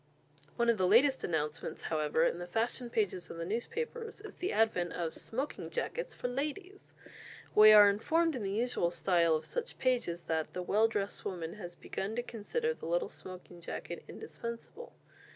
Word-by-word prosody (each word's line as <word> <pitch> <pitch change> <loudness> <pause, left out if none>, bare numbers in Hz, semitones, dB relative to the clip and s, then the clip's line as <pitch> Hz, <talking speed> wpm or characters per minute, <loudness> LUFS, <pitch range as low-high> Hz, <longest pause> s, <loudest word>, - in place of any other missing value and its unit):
One 235 -1 +1
of 230 -3 +3
the 185 - +3
latest 265 +7 +5
announcements, 155 -1 -2
however, 155 0 +1
in 170 - +1
the 175 - -5
fashion 235 +5 -1
pages 205 -6 -1
of - - -7
the 165 - -3
newspapers 445 - -4
is 425 -1 -11
the 370 - -1
advent 180 -6 +2
of 165 -2 -2
"Smoking 265 +6 -4
Jackets" - - -3
for - - -3
ladies! 305 +10 -5 0.6
We 215 0 +9
are 210 -1 +10
informed 320 +11 +2
in 250 - -3
the 195 - -2
usual 220 -3 +1
style 170 -2 +3
of 155 - -3
such 485 0 -4
pages, 240 -10 0
that 160 -1 -2
"the 180 - -3
well 215 +5 +4
dressed 205 -3 -3
woman 170 -3 -4
has 175 -4 -8
begun 200 +3 -4
to 240 - -1
consider 450 - -2
the - - -8
little 175 +1 0
smoking 180 -1 -10
jacket - - -6
indispensable." 235 - -8
215 Hz, 175 wpm, -32 LUFS, 175-260 Hz, 0.6 s, are